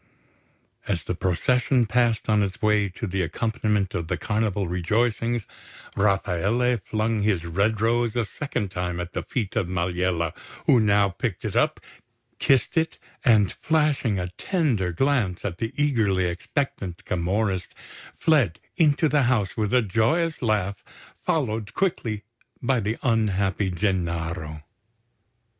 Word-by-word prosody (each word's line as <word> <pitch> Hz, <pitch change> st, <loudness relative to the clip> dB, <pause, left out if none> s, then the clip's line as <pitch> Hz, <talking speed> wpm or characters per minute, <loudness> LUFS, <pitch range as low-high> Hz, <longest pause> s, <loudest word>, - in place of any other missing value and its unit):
As 90 Hz, -6 st, -1 dB
the -, -, -2 dB
procession 120 Hz, +8 st, +2 dB
passed 115 Hz, 0 st, +1 dB
on 105 Hz, -1 st, +3 dB
its 95 Hz, -2 st, -2 dB
way 105 Hz, -2 st, +2 dB
to 95 Hz, +5 st, -6 dB
the 95 Hz, -2 st, -1 dB
accompaniment 105 Hz, +2 st, -1 dB
of 85 Hz, -1 st, -3 dB
the 90 Hz, 0 st, -1 dB
Carnival 105 Hz, -3 st, -1 dB
rejoicings, 110 Hz, +5 st, 0 dB, 0.5 s
Rafaele 105 Hz, +5 st, +1 dB
flung 110 Hz, 0 st, 0 dB
his 100 Hz, -5 st, +1 dB
red 100 Hz, +6 st, +1 dB
rose 115 Hz, +1 st, +1 dB
a 120 Hz, -2 st, +1 dB
second 110 Hz, -5 st, -4 dB
time 90 Hz, -1 st, -3 dB
at 90 Hz, 0 st, -5 dB
the -, -, -2 dB
feet 110 Hz, -7 st, -3 dB
of 105 Hz, -6 st, +1 dB
Maliella, 90 Hz, -1 st, 0 dB, 0.3 s
who 125 Hz, -, +6 dB
now 100 Hz, -2 st, +4 dB
picked 95 Hz, +2 st, -4 dB
it -, -, -3 dB
up, -, -, +2 dB, 0.6 s
kissed 135 Hz, +1 st, +2 dB
it, 160 Hz, 0 st, +1 dB, 0.3 s
and 110 Hz, -7 st, +4 dB
flashing 150 Hz, -9 st, +1 dB
a 90 Hz, -1 st, -2 dB
tender 135 Hz, -, 0 dB
glance 115 Hz, -, 0 dB
at 90 Hz, -3 st, -3 dB
the 115 Hz, 0 st, -2 dB
eagerly 110 Hz, -11 st, +2 dB
expectant 90 Hz, -, -3 dB
Camorrist, 95 Hz, +1 st, -1 dB, 0.4 s
fled 135 Hz, -, +2 dB, 0.2 s
into 155 Hz, -2 st, +4 dB
the 150 Hz, 0 st, +3 dB
house 110 Hz, -7 st, +1 dB
with 105 Hz, -2 st, -1 dB
a 125 Hz, -2 st, +4 dB
joyous 115 Hz, -, +1 dB
laugh, 100 Hz, -4 st, 0 dB, 0.4 s
followed 110 Hz, -8 st, -1 dB
quickly 115 Hz, -, -1 dB, 0.4 s
by 125 Hz, 0 st, +1 dB
the 110 Hz, +2 st, -2 dB
unhappy 100 Hz, -4 st, +1 dB
Gennaro. 85 Hz, -5 st, -2 dB
105 Hz, 135 wpm, -25 LUFS, 90-120 Hz, 0.6 s, who